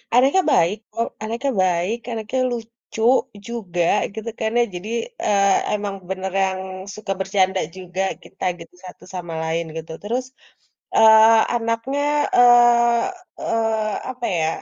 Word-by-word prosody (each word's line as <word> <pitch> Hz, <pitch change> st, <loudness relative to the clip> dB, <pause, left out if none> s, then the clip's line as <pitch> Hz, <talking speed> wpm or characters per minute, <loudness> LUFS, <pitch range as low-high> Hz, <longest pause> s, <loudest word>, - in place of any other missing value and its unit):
anaknya 275 Hz, +9 st, +5 dB
baik 170 Hz, +5 st, +3 dB, 0.2 s
kok, 230 Hz, +1 st, -1 dB, 0.2 s
anaknya 235 Hz, +5 st, -2 dB
baik, 180 Hz, +5 st, 0 dB
anaknya 230 Hz, +3 st, -3 dB
lucu 230 Hz, -1 st, -6 dB, 0.4 s
juga 195 Hz, -7 st, -2 dB, 0.3 s
gitu, 220 Hz, +1 st, -5 dB
kan, 220 Hz, 0 st, -1 dB
ya 240 Hz, -, +5 dB
jadi, 185 Hz, +5 st, -6 dB, 0.4 s
eee, 200 Hz, -1 st, +3 dB, 0.2 s
emang 205 Hz, -1 st, -2 dB
beneran 190 Hz, 0 st, -1 dB, 0.4 s
suka 210 Hz, -2 st, -3 dB
bercanda 190 Hz, -1 st, +1 dB, 0.2 s
juga 185 Hz, 0 st, -5 dB, 0.2 s
kita -, -, -12 dB, 0.2 s
gitu 165 Hz, +1 st, -13 dB
satu 180 Hz, -, -12 dB
sama 175 Hz, -2 st, -5 dB
lain 165 Hz, +1 st, -1 dB
gitu. 160 Hz, 0 st, -7 dB
Terus, 245 Hz, +5 st, -2 dB, 0.7 s
eee, 220 Hz, 0 st, +7 dB
anaknya, 230 Hz, +4 st, -1 dB, 0.4 s
eee, 240 Hz, -1 st, +6 dB, 0.4 s
eee, 220 Hz, -2 st, 0 dB, 0.2 s
apa, 250 Hz, -1 st, -7 dB
ya, 160 Hz, -1 st, +1 dB
220 Hz, 125 wpm, -21 LUFS, 190-235 Hz, 0.7 s, eee